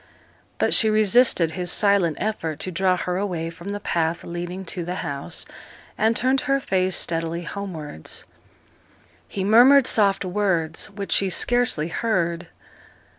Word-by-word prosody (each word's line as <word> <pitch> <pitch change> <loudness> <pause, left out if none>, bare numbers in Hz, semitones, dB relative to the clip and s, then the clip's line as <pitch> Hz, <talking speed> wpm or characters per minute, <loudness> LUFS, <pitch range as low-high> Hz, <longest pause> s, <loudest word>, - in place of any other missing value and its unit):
But - - +1
she 220 - +4
resisted 215 -5 +3
his 180 0 -3
silent 200 -6 +2
effort 165 -8 -3
to 185 - -2
draw 185 +1 +1
her 180 0 -2
away 175 -4 -3
from 170 +3 -12
the 205 0 -4
path 165 -3 -1
leading 175 +2 -6
to 175 0 -5
the 180 +2 -4
house, 140 -2 -3 0.5
and 220 +2 +1
turned 260 +2 +1
her 275 0 +1
face 185 -6 0
steadily 165 +1 -2
homewards. 165 - -6 1.0
He 195 - -4
murmured 245 +6 +6
soft 200 -5 +2
words, 180 -5 -1
which 200 -1 -7
she 195 - +2
scarcely 235 -6 +1
heard. 170 -5 -1
185 Hz, 140 wpm, -23 LUFS, 170-210 Hz, 1.0 s, murmured